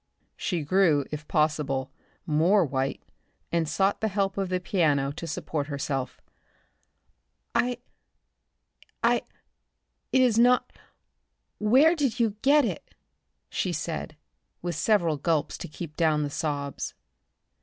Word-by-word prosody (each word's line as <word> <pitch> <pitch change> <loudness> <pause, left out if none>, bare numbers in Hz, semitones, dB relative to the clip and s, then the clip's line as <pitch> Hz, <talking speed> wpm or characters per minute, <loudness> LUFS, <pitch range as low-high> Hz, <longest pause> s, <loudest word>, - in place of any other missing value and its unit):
She 175 -5 -2
grew, 155 -3 +3
if 150 0 -6
possible, 150 -4 0 0.3
more 170 +5 +3
white 135 -1 -2 0.5
and 165 -2 0
sought 195 +3 +1
the 220 - +2
help 195 -1 0
of 195 -2 -2
the 185 0 0
piano 150 -7 +1
to 165 +3 -7
support 145 -2 -3
herself. 140 -3 -3 1.3
"I 245 -1 +1 1.3
I - - +3 0.9
It 260 - +4
is 230 -3 +3
not 245 +1 +4 0.9
Where 265 +11 +5
did 275 -7 -1
you 230 -2 +3
get 285 +1 +5
it?" - - -5 0.5
she 185 - -2
said, 160 -1 -4 0.5
with 175 -1 -2
several 170 -2 +2
gulps 155 +1 0
to - - -6
keep 155 0 -8
down 155 -3 +2
the 145 - -3
sobs. 145 -2 -3
165 Hz, 125 wpm, -27 LUFS, 150-205 Hz, 1.3 s, Where